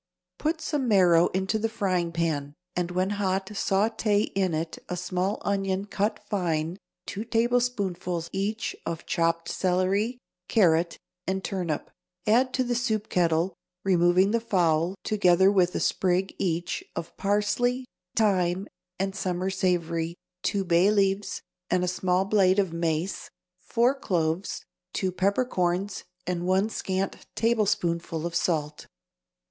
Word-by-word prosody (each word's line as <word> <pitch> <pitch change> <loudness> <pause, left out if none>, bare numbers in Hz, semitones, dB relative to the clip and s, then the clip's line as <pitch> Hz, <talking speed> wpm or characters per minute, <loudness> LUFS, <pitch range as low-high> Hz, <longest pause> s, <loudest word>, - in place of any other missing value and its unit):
Put 320 +1 -1
some 290 -5 -1
marrow 180 -5 +5
into 190 +3 -1
the 225 +1 0
frying 185 -6 0
pan, 155 -4 -1 0.2
and 175 -1 -1
when 185 +2 0
hot 190 0 +1
sauté 210 +1 +1
in 190 -4 +1
it 160 +1 -3
a 180 - -2
small 180 +3 -1
onion 195 -1 0
cut 205 +1 -1
fine, 170 -3 -1 0.3
two 205 - -4
tablespoonfuls, 225 -8 0
each, 210 +4 -2
of 165 -1 -4
chopped 165 -1 0
celery, 190 +6 +1 0.3
carrot 170 -5 +3 0.3
and 190 0 -1
turnip; 175 -6 -3 0.3
add 245 +4 +4
to 255 - +2
the 245 -1 -1
soup 220 -3 -1
kettle, 170 +1 +2 0.3
removing 185 +1 +4
the 230 - +2
fowl, 175 -5 +1
together 190 -2 +4
with 180 -2 +2
a - - +1
sprig, 185 +1 +1
each, 175 -1 -1
of 170 -1 -5
parsley, 210 +5 +1 0.3
thyme 190 -3 +2 0.3
and 195 +1 -2
summer 185 -2 -1
savory, 170 -3 0 0.3
two 200 -2 0
bay 175 +2 +4
leaves, 200 -1 +1 0.3
a 180 0 +2
small 180 +1 +1
blade 195 -2 +4
of 190 -4 +1
mace, 165 +2 -2 0.3
four 240 +6 +2
cloves, 175 -8 -1 0.3
two 190 -1 0
peppercorns 190 -1 0 0.2
and 175 0 -2
one 190 +3 +3
scant 190 -2 -3
tablespoonful 185 -8 0
of 170 - -3
salt. 155 -3 -1
190 Hz, 130 wpm, -27 LUFS, 175-205 Hz, 0.3 s, marrow